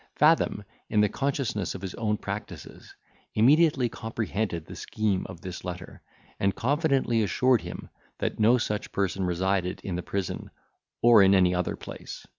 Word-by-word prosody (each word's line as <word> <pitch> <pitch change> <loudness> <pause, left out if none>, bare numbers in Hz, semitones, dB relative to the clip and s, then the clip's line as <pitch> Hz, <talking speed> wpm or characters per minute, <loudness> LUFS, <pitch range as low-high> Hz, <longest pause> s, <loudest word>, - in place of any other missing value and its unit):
Fathom, 150 -8 +3 0.3
in 105 -1 +3
the 105 - +3
consciousness 135 -7 -2
of 95 - -8
his 95 - -4
own 105 -2 -1
practices, 100 +1 -8 0.4
immediately 140 +3 +4
comprehended 110 -6 -3
the - - -10
scheme 105 -3 -1
of 90 -2 -10
this 90 0 -7
letter, 90 +1 -7 0.4
and 100 0 +1
confidently 135 -4 +1
assured 125 +4 +2
him - - -8 0.3
that - - -3
no 115 +4 +5
such 105 -3 -3
person 95 -1 -1
resided 90 +1 0
in 95 - -3
the 90 - -2
prison 95 0 -4 0.5
or 120 -3 +8
in 95 0 +6
any 90 -1 +4
other 90 -1 -1
place. - - -9
105 Hz, 155 wpm, -27 LUFS, 95-120 Hz, 0.5 s, or